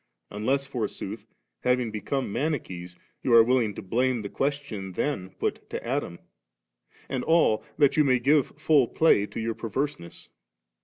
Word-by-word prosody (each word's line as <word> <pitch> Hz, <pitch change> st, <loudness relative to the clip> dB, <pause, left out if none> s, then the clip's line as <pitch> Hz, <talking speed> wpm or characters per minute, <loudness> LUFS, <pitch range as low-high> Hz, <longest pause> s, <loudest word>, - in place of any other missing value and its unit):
unless 130 Hz, +7 st, 0 dB
forsooth, 125 Hz, -6 st, -5 dB, 0.3 s
having 125 Hz, -2 st, +1 dB
become 110 Hz, +2 st, -3 dB
Mani 155 Hz, +1 st, +1 dB
chees, 90 Hz, -5 st, -9 dB, 0.3 s
you 130 Hz, -, -1 dB
are 115 Hz, -, +9 dB
willing 115 Hz, -4 st, +1 dB
to -, -, -7 dB
blame' 120 Hz, +4 st, 0 dB
the 100 Hz, -, -5 dB
question 135 Hz, -10 st, -3 dB
then 95 Hz, -6 st, -2 dB
put -, -, -4 dB
to -, -, -5 dB
Adam 120 Hz, -8 st, -2 dB, 0.9 s
and 130 Hz, -2 st, -2 dB
all 160 Hz, -10 st, +3 dB
that 145 Hz, -1 st, +4 dB
you 155 Hz, -, +6 dB
may 130 Hz, -3 st, +3 dB
give 140 Hz, +3 st, +2 dB
fiill 150 Hz, -4 st, +4 dB
play* 105 Hz, -11 st, +4 dB
to -, -, -7 dB
your 115 Hz, 0 st, -1 dB
perverseness. 115 Hz, -4 st, -4 dB
125 Hz, 155 wpm, -26 LUFS, 105-140 Hz, 0.9 s, are